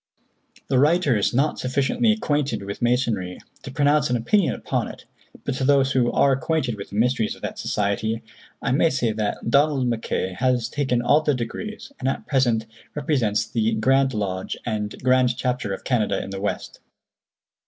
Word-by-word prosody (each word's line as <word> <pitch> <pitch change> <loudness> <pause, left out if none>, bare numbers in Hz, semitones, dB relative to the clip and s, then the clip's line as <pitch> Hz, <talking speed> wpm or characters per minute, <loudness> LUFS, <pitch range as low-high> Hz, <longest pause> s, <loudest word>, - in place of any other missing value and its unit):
The 130 -2 +2
writer 150 -2 +3
is 105 - +1
not 140 +5 +1
sufficiently 135 - +1
acquainted 145 - -1
with 100 +1 -6
Masonry 120 -7 0 0.2
to - - -8
pronounce 145 +1 +2
an 125 - +1
opinion 170 - +2
upon - - -2
it, - - -11 0.4
but - - -2
to - - -2
those 135 -1 +3
who 125 -3 +2
are 140 - +3
acquainted 135 -1 0
with 100 - -8
the - - -9
mysteries 115 0 +1
of - - -19
that - - -5
society, 105 +2 -1 0.4
I 135 - 0
may 155 +5 +4
say 130 -6 0
that 110 0 -3
Donald 140 -1 +3
Mackay 110 -5 -2
has 125 -2 +1
taken 130 -4 0
all 145 +5 +4
the 150 -2 +1
degrees, 215 - -6
and 130 - 0
at - - -3
present 120 -5 +1 0.3
represents 120 -8 +1
the 110 0 0
Grand 135 +3 +2
Lodge 95 -3 -3
and 105 -3 -2
Grand 130 -1 +3
Chapter 125 -5 -1
of - - -5
Canada 105 -6 +1
in - - -8
the 95 0 -5
west. 100 - -4
125 Hz, 175 wpm, -23 LUFS, 110-140 Hz, 0.4 s, may